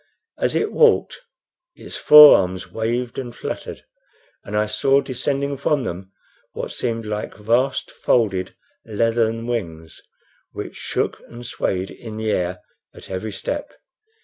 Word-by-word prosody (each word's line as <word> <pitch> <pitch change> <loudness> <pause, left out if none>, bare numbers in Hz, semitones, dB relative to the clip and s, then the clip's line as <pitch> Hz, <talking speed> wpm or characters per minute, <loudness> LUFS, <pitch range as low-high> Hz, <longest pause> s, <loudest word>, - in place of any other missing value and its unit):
As - - 0
it 430 - 0
walked 465 -2 +3 0.6
its - - -10
forearms 95 -12 +7
waved 120 +2 -2
and 120 -3 -7
fluttered, - - -6 0.6
and 105 +1 -4
I 105 - +2
saw 135 +6 +2
descending 140 +1 -2
from 140 0 0
them 95 -2 -6 0.4
what - - -5
seemed 115 -2 -3
like 105 0 -4
vast 120 +5 0
folded 95 -6 0 0.3
leathern 115 +1 0
wings, 85 -10 -5 0.5
which - - -7
shook - - -2
and 120 +1 -11
swayed 95 -5 -2
in 110 -2 -9
the 110 0 -1
air 90 -1 -2 0.3
at - - -11
every 95 +4 -4
step. 290 - -5
115 Hz, 130 wpm, -21 LUFS, 100-125 Hz, 0.6 s, forearms